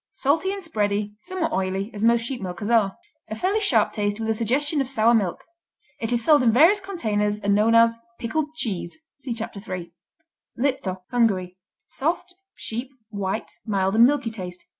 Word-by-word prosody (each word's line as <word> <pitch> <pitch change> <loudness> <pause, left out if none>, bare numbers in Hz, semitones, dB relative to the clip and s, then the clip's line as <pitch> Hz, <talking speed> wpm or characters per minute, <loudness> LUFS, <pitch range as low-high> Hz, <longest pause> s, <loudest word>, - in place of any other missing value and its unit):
Salty 320 +5 +1
and 395 -1 -5
spready, 210 -8 -1
somewhat 360 -1 -3
oily, 190 -1 -1
as 205 0 -5
most 235 0 +4
sheep 240 +1 -4
milkers 195 +4 -4
are. 210 -5 +3 0.3
A 220 - -4
fairly 385 - 0
sharp 400 -2 +3
taste 205 -1 -1
with 225 0 -2
a - - +2
suggestion 275 +7 0
of 265 - -3
sour 235 -3 +3
milk. 200 -7 0 0.6
It 225 +1 -3
is 235 -1 +1
sold 300 -3 +6
in 235 -2 +4
various 330 - +6
containers 210 - -1
and 205 -1 +1
known 215 +3 +4
as 230 0 +5 0.2
"pickled 300 +6 -2
cheese." 195 - -3 0.2
(See 265 -2 -6
Chapter 225 -2 -6
3.) 185 -4 -6 0.7
Lipto 235 -8 -1
Hungary 195 -7 +1 0.3
Soft; 345 +5 -2 0.2
sheep; 240 +4 -5 0.2
white; 200 +1 -3
mild 195 -3 0
and 230 +2 +8
milky 275 -5 0
taste. 180 -4 -7
230 Hz, 175 wpm, -24 LUFS, 205-275 Hz, 0.7 s, and